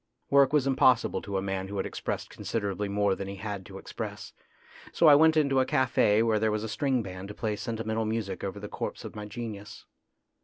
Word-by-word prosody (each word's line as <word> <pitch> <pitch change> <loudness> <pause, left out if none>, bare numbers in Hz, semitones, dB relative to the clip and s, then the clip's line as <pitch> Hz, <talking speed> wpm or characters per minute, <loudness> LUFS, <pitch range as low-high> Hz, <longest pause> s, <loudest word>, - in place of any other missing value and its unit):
Work 140 -1 +6
was 150 -3 +3
impossible 130 -3 +3
to 100 -1 -3
a 95 - -2
man 95 -1 -3
who 100 +1 -5
had 95 - -1
expressed - - -4
considerably 100 -2 -3
more 100 0 +2
than 95 0 -5
he 100 - -6
had 100 -2 -6
to - - -9
express, - - -7 0.6
so - - +2
I 150 - +9
went 160 +2 +6
into 140 -3 +3
a 130 - +3
cafe 115 -4 +3
where 110 -2 +2
there 110 +1 +2
was 105 0 -1
a 110 - -4
string 130 +2 0
band 95 0 -7
to 105 - -9
play 110 -1 -2
senti 115 +2 -4
mental 110 0 -1
music 110 -3 -3
over 100 +1 -4
the 105 - -6
corpse - - -5
of - - -8
my 105 -1 -6
genius. 105 -2 -7
110 Hz, 225 wpm, -28 LUFS, 100-125 Hz, 0.6 s, I